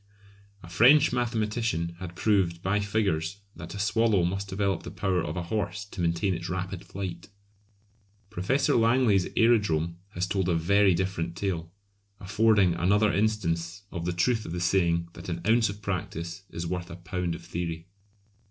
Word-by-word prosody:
A - - -10
French 125 - +5
mathematician 110 -8 -1
had 90 -2 -7
proved 90 -4 +1
by 100 +2 +1
figures 100 -3 -1
that - - -8
a - - -6
swallow 110 -2 +2
must 95 +3 -2
develop 95 -1 -1
the - - -8
power 95 -4 -1
of - - -4
a 90 - -2
horse 105 +2 -3
to 100 -2 -7
maintain 85 +3 +1
its 85 0 -5
rapid 90 0 -4
flight! 95 -1 -6 1.0
Professor 110 +8 +1
Langley's 115 -5 +3
aerodrome 100 -8 +2 0.2
has 90 +1 0
told 95 -1 -1
a 85 - +2
very 95 +3 +4
different 85 -2 -2
tale, 85 -3 -3 0.5
affording 105 -1 +3
another 100 +5 +2
instance 95 -3 -1
of 85 -2 -4
the 90 - 0
truth 110 +6 +1
of 85 - -6
the 90 - -3
saying 85 -1 +1
that 85 +1 -9
an 85 -1 -3
ounce 115 +1 +4
of 105 +1 -8
practice 90 -1 -4
is 85 - -5
worth 90 +1 -4
a 85 - -7
pound 90 -1 -3
of 85 0 -11
theory. 85 -1 -4
95 Hz, 165 wpm, -27 LUFS, 85-105 Hz, 1.0 s, French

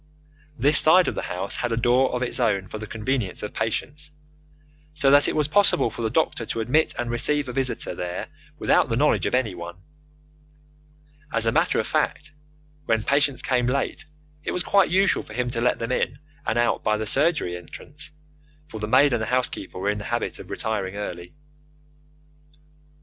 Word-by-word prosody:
This 145 +4 +5
side 180 +3 +6
of - - 0
the - - -3
house 95 +2 -3
had 120 - -2
a 115 - 0
door 125 +3 +2
of 125 - -1
its 125 - -1
own 100 -6 +1
for 110 - -7
the 110 - -7
convenience 110 -3 -2
of 105 - -5
patients, 145 +7 -3 0.9
so 140 -2 +3
that 145 0 +6
it - - -1
was 150 -2 +2
possible 155 - +3
for 115 - -7
the 110 - 0
doctor 125 -2 0
to 115 - -4
admit 130 +8 +1
and 120 -1 -2
receive 145 +4 +2
a 125 - -5
visitor 130 -7 -1
there 90 0 -5 0.3
without - - +2
the - - 0
knowledge - - +2
of - - 0
anyone. 90 -9 -3 1.5
As 115 -1 +1
a 115 - +3
matter - - +2
of - - 0
fact, 150 +1 -1 0.6
when 115 -1 +1
patients 140 +1 +1
came 125 -1 +1
late 140 +4 -1 0.4
it - - -3
was 180 - -1
quite 195 0 +3
usual 190 +1 +3
for - - -13
him 125 +1 -2
to 115 -1 -2
let 125 - +2
them 115 +1 -4
in 130 - -1 0.3
and - - 0
out 120 0 +1
by 105 0 +1
the 110 - -3
surgery 140 - +1
entrance, 90 - -10 0.6
for 110 - -7
the 105 - -3
maid 135 +4 +4
and 120 - 0
the 110 - -2
housekeeper 125 -7 -2
were 100 +2 0
in 105 - -4
the 100 - -7
habit - - -3
of - - -11
retiring 100 -3 -3
early. 90 -1 -6
120 Hz, 195 wpm, -24 LUFS, 105-140 Hz, 1.5 s, side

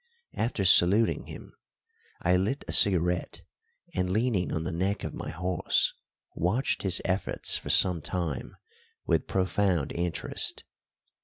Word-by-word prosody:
After 110 -4 -2
saluting 95 +5 +4
him, - - -11 0.7
I 90 +1 +2
lit 100 +10 -2
a - - -5
cigarette, 90 -3 +4 0.5
and, 90 0 -2
leaning 105 -2 -1
on 80 - -3
the 90 - -4
neck 95 +4 -2
of - - -5
my - - -7
horse, 90 +3 0 0.4
watched 110 - -1
his 95 -2 +1
efforts 95 +1 -1
for - - -5
some 90 -4 +4
time 85 -5 -5 0.5
with - - 0
profound 95 -4 -1
interest. 85 -2 -2
90 Hz, 130 wpm, -27 LUFS, 85-100 Hz, 0.7 s, saluting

